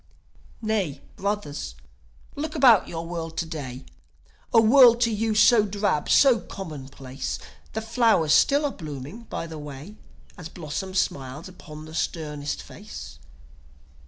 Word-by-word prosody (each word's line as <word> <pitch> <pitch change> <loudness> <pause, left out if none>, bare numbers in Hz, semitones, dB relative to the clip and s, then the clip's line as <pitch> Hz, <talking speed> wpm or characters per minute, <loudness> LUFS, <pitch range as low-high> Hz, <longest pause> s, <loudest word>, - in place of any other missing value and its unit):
Nay, 195 -10 -1 0.2
brothers, 190 - -3 0.6
look 305 +2 -4
about 250 - +6
your 165 0 -5
world 165 -1 -5
to - - 0
day: 135 -6 -7 0.7
A 230 - +6
world 235 +1 +7
to 230 -1 +3
you 220 0 0
so 215 +1 +6
drab, 200 -6 -1
so 260 -5 +6
commonplace 135 -8 -7 0.4
The 220 - -3
flowers 225 -9 +3
still 290 +1 +4
are 285 - 0
blooming 155 - -8
by - - -5
the 160 -2 -8
way, 150 +8 -9 0.4
As 165 -2 -7
blossom 185 +4 -5
smiles 140 -3 -2
upon 155 -4 -11
the 155 - -11
sternest 150 - -3
face. 65 -1 -10
170 Hz, 130 wpm, -25 LUFS, 150-220 Hz, 0.7 s, world